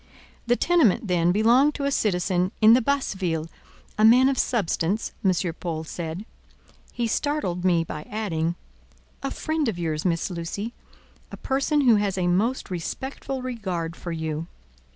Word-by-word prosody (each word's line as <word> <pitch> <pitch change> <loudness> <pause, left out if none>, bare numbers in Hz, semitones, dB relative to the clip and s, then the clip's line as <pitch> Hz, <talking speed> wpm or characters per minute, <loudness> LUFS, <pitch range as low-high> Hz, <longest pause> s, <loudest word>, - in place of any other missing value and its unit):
The 240 - +4
tenement, 270 - +3
then, 175 -1 +2
belonged 240 +9 +4
to 285 - -4
a 280 - +1
citizen 185 -5 +1
in 220 0 +7
the 250 - +5
Basse 280 +1 0
Ville—a 170 +3 -5
man 250 +4 +7
of 270 - -1
substance, 205 -2 0
M. 190 - +4 0.3
Paul 160 -3 -3
said; 165 +4 -6 0.7
he 240 - -2
startled 230 - -1
me 175 -3 +3
by 150 -1 -7
adding: 170 -6 -1 0.7
"a 275 - -2
friend 310 0 -2
of 200 - -4
yours, 160 -3 -2
Miss 175 +1 0
Lucy, 180 +7 -4 0.6
a - - -7
person 275 +3 +1
who 240 -5 +5
has 200 -2 -1
a 180 - 0
most 205 +6 0
respectful 265 - -4
regard 185 -10 -3
for 175 - -6
you." 160 0 -3
195 Hz, 150 wpm, -25 LUFS, 170-250 Hz, 0.7 s, in